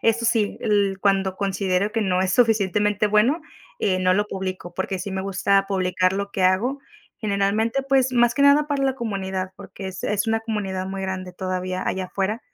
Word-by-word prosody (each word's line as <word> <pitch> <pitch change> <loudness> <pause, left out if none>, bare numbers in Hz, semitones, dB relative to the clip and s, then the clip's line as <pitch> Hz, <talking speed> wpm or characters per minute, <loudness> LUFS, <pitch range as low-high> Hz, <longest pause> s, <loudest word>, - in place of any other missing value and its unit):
eso 230 +1 +2
sí, 225 -3 +1
el 200 -2 +1
cuando 195 -1 +1
considero 195 0 0
que 225 - 0
no 185 -3 +1
es 190 0 0
suficientemente 210 -3 +2
bueno, 235 +10 +3 0.4
eh, 185 -2 +1
no 185 0 +3
lo 205 +2 +1
publico, 185 -3 -5
porque 190 +1 -3
sí 190 +2 -5
me 190 0 -2
gusta 195 0 +1
publicar 185 -1 +1
lo 200 0 -3
que 190 - -2
hago. 220 +10 +2 0.4
Generalmente, 215 +5 0
pues, 270 -1 +2
más 240 0 +4
que - - -3
nada 285 +1 +5
para 285 -2 -1
la 265 -1 +1
comunidad, 190 -5 -3
porque 190 0 -8
es 185 -1 -8
es 210 +1 0
una 225 0 +1
comunidad 200 -4 -3
muy 195 0 -5
grande 185 -1 -4
todavía 185 0 -3
allá 185 -1 -1
afuera, 200 +5 -2
200 Hz, 190 wpm, -23 LUFS, 190-225 Hz, 0.4 s, nada